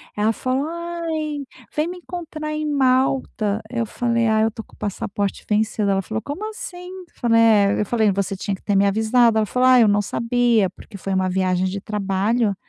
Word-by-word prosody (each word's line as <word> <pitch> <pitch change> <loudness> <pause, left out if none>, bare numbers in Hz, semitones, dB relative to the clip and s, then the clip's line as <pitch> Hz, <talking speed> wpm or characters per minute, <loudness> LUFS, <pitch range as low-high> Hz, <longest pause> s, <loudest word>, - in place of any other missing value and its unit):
Ela 210 +2 +2
falou: 260 +5 -1
"Ai, 330 -3 -4 0.3
vem 305 +2 +1
me 360 - -6
encontrar 320 -4 -6
em 305 0 -2
Malta." 255 -6 +1
Eu 235 -2 -1
falei: 235 +1 0
"Ai, 220 0 +3
eu 225 - +1
tô 225 +1 -8
com - - -26
o - - -26
passaporte 200 0 -3
vencido." 210 -1 +1
Ela 195 0 +2
falou: 220 +3 -4
"como 310 - -5
assim?" 360 -4 -8
Eu 370 0 -9
falei: 230 -1 +4
"é.". 210 -3 +4
Eu - - 0
falei: 220 -2 +2
"você 195 0 -2
tinha 195 0 -2
que - - -17
ter 205 - -1
me 195 +1 +4
avisado." 220 +3 +3
Ela 215 - +2
falou: 250 +3 +2
"ai, 255 -2 +7
eu 220 - +4
não 205 0 +3
sabia." 230 -1 +1
Porque 200 - -15
foi 195 0 -4
uma 185 0 +1
viagem 185 0 +1
de 190 +1 -3
trabalho. 205 +2 0
225 Hz, 210 wpm, -21 LUFS, 205-275 Hz, 0.3 s, ai